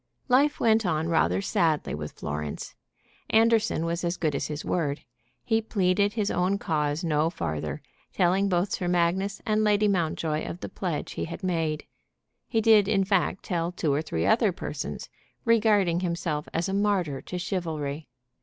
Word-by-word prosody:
Life 280 +4 +4
went 225 -1 +3
on 160 -3 0
rather 95 - +2
sadly 160 -3 +1
with 75 0 -5
Florence. 75 0 -5 0.6
Anderson 225 -6 +3
was 170 +1 -2
as 175 +1 -1
good 155 -3 0
as - - -2
his 150 0 -5
word. 150 -5 -1 0.4
He 225 -1 +1
pleaded 200 -1 +1
his 210 -3 0
own 185 +3 +1
cause 150 -2 -1
no 155 -1 +2
farther, 75 - -4 0.3
telling 190 +3 +2
both 180 +1 +1
Sir 180 - -2
Magnus 180 +3 0
and 215 0 +2
Lady 210 0 +3
Mountjoy 160 -4 0
of 175 - -6
the - - -5
pledge 175 -6 -3
he - - -3
had 170 +4 -8
made. 165 -4 -1 0.6
He 225 - +1
did 215 -3 +5
in 195 -2 +2
fact 190 -1 0
tell 170 -2 -1
two 160 -5 0
or 145 - +1
three 85 - -2
other - - +4
persons, 75 - -5 0.4
regarding 210 -6 +3
himself 170 -4 -2
as 165 +3 -1
a 190 - -2
martyr 195 -9 0
to 180 - -6
chivalry. 160 -5 -3
175 Hz, 165 wpm, -27 LUFS, 155-200 Hz, 0.6 s, did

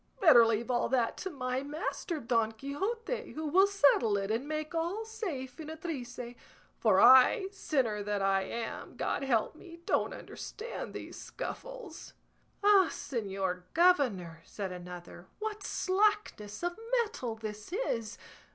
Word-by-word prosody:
Better 240 -11 +8
leave 230 +2 0
all 240 - +1
that 245 -3 +1
to 380 - -4
my 255 -4 -2
master 310 +4 -3
Don 230 -3 +1
Quixote, 390 - -3
who 315 +1 -4
will 370 +6 +5
settle 280 - +4
it 195 +1 -2
and 235 +6 -1
make 310 +1 -3
all 345 +7 -1
safe 350 - -5
in 310 -1 -7
a 320 - -5
trice; 285 -8 -6 0.6
for 205 -5 +4
I, 260 - +7
sinner 255 - 0
that 205 0 -1
I 195 0 +2
am, 230 +4 -5
God - - -1
help 235 -5 +1
me, 335 0 -12
don't - - +1
understand 460 +3 -7
these - - -7
scuffles." - - -7 0.5
"Ah, 400 -3 +6
señor 195 -6 -3
governor," 245 - +3
said 195 -3 -5
another, 180 0 -9
"what 430 -1 -4
slackness 380 - 0
of 350 0 -1 0.3
mettle 250 - -5
this 215 +2 -7
is! 230 - -2
265 Hz, 140 wpm, -31 LUFS, 220-365 Hz, 0.6 s, Better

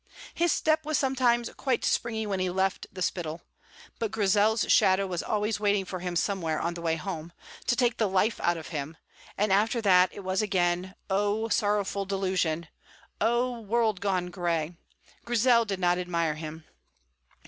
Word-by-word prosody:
His 345 -1 +2
step 310 0 +1
was 305 -1 0
sometimes 250 -3 +2
quite 260 -4 0
springy 220 -2 0
when 200 -2 -2
he 185 0 0
left 190 +1 -1
the 185 -1 -4
Spittal; 170 -2 -3 0.6
but 225 - -1
Grizel's 210 +1 +2
shadow 190 +1 +4
was 180 -3 -3
always 210 0 -1
waiting 205 -2 +1
for 185 0 -5
him 180 0 -4
somewhere 170 -4 0
on 170 +1 -1
the 170 - -8
way 165 -1 +1
home, 165 -1 -6 0.4
to 240 - +3
take 240 -2 +1
the 215 -3 +2
life 195 +4 +1
out 175 0 +1
of 160 - -8
him, 155 0 -5 0.4
and 205 -1 +2
after 220 +4 +2
that 185 -4 +5
it - - -9
was 185 +1 0
again, 185 -2 0
oh, 205 +3 0
sorrowful 205 -2 0
disillusion! 185 -4 -1 0.5
oh, 240 +1 +1
world 220 -2 0
gone 185 -3 -1
gray! 170 -3 -1 0.5
Grizel 235 0 +3
did 195 -3 -3
not 180 0 +2
admire 170 -3 0
him. 155 +1 -8
195 Hz, 170 wpm, -28 LUFS, 175-220 Hz, 0.6 s, that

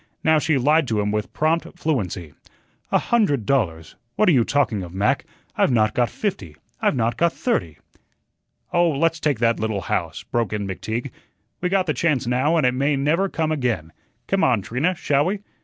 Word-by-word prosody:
Now 160 -1 +4
she 150 -1 +1
lied 150 +3 +3
to 110 -3 0
him 105 0 0
with 105 0 -2
prompt 165 +2 -1
fluency. 95 - -2 0.6
"A - - +5
hundred 170 - +1
dollars! 90 -12 -1 0.2
What 215 - +2
are - - +6
you 130 -7 +4
talking 120 -6 0
of, 90 0 -8
Mac? 100 +2 +1 0.3
I've - - +3
not 110 -4 +2
got 120 -1 +1
fifty. 180 - -4 0.3
I've - - +2
not 115 -1 0
got 170 0 +3
THIRTY." 85 - -1 1.0
"Oh, 175 -1 +4
let's 165 +2 +1
take 150 -5 0
that 115 0 +1
little 110 -2 -1
house," - - -3
broke 115 -3 -2
in 105 -2 -2
McTeague. 110 +7 -4 0.5
"We 180 - 0
got 190 -1 +2
the 155 - 0
chance 145 -1 0
now, 130 +7 +1
and 155 - +2
it 125 - +3
may 140 +3 +1
never 160 +8 +1
come 160 -2 -1
again. 120 - -2 0.3
Come 195 0 0
on, 115 -6 +2
Trina, 130 - 0
shall 145 -2 +1
we? 195 +3 -2
135 Hz, 190 wpm, -22 LUFS, 110-160 Hz, 1.0 s, are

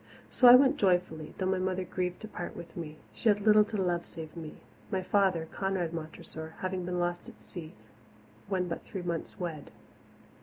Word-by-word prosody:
So 250 - +6
I 245 - +12
went 275 +3 +5
joyfully 175 - +1
though 190 - -1
my 190 0 +1
mother 185 0 0
grieved 180 0 -3
to 215 - -6
part 175 -4 -6
with 170 - -9
me; 155 -3 -6 0.2
she 230 - +2
had 205 0 +3
little 210 0 +7
to 215 - -4
love 175 -2 0
save 160 0 -9
me, 160 -2 -7 0.3
my 190 -1 -1
father, 185 -4 +2
Conrad 190 -4 -1
Montressor, 160 0 -7
having 185 -1 -2
been 180 0 -2
lost 175 0 -1
at - - -14
sea 165 -4 -9 0.8
when 185 -2 0
but 170 - -4
three 190 - -6
months 170 -2 -4
wed. 165 -5 -4
180 Hz, 190 wpm, -30 LUFS, 165-190 Hz, 0.8 s, I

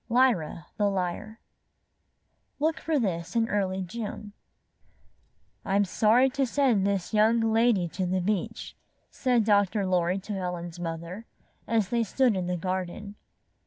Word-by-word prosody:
LYRA, 230 -11 +2
THE 205 -1 +2
LYRE 195 +4 -3 1.2
Look 310 -1 +1
for 315 +1 0
this 180 -6 -2
in 225 -1 +2
early 190 -3 -1
June 210 +1 -6 1.3
"I'm 200 +1 +2
sorry 225 +7 +4
to 275 -1 0
send 235 -7 +2
this 200 0 -2
young 220 +2 +4
lady 225 -4 +2
to 185 +2 -3
the 185 +1 0
beach," 195 +1 -3 0.4
said 250 -4 +1
Dr. 205 -1 +2
Lorry 180 0 +1
to 195 +2 -6
Helen's 175 -2 -4
mother, 170 +5 -6 0.4
as 220 -4 +1
they 235 0 +1
stood 240 +1 +2
in 185 -2 -2
the 180 0 -1
garden. 185 +3 -4
200 Hz, 135 wpm, -27 LUFS, 180-230 Hz, 1.3 s, sorry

